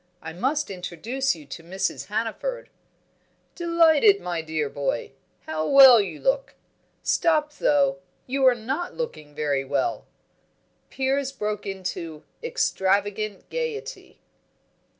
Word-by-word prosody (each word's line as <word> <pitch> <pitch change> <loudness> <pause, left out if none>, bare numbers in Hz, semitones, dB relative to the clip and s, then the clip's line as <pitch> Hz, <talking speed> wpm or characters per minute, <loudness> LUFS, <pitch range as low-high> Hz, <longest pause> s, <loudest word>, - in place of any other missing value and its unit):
I 160 -1 -8
must 270 - -1
introduce 195 +8 -2
you 155 -3 -13
to 140 +4 -9
Mrs. 190 +3 -3
Hannaford." 230 - -3 0.8
"Delighted, 335 +3 +4
my 175 -2 -3
dear 155 -2 -2
boy! 140 -4 -3 0.3
How 155 0 -3
well 265 -5 +9
you 200 - -5
look! - - 0 0.5
stop 310 -3 +2
though; 280 -9 +2 0.3
you 270 +1 -1
are 250 - +6
not 265 +10 -4
looking 155 - -6
very 145 -3 0
well 135 0 -2 0.4
" - - -43
Piers 270 +1 -1
broke 210 -5 -4
into 175 -5 -5 0.2
extravagant 205 - 0
gaiety. 475 -3 -5
220 Hz, 115 wpm, -25 LUFS, -, 0.8 s, well